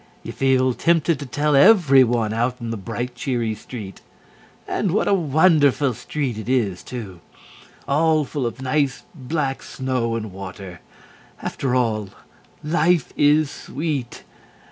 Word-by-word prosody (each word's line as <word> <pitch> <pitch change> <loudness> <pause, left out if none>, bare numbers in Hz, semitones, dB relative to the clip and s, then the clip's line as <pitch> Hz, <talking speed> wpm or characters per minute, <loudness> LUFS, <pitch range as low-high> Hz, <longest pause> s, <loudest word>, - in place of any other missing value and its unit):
You - - -6
feel 130 -1 +2
tempted 165 +1 +1
to 140 - -7
tell 145 +3 +1
everyone 135 - +5
out 120 +3 -1
in 115 -1 -5
the - - -2
bright, 115 +4 -5
cheery 120 -3 -2
street. 105 -2 -9 0.7
And 205 - -1
what 215 - +1
a - - +3
wonderful 150 -5 +3
street 125 0 -4
it 110 - -7
is 110 -8 0
too! 105 -8 -8 0.7
All 155 +1 +2
full 135 -3 -2
of 120 +3 -7
nice, 135 +1 0
black 140 -2 -3
snow 125 -3 -2
and 110 -3 -4
water. 95 -2 -9 0.6
After 130 -2 -2
all, 110 -5 0 0.5
Life 165 0 +1
is 150 0 +3
sweet! 140 -4 -4
130 Hz, 135 wpm, -22 LUFS, 115-150 Hz, 0.7 s, everyone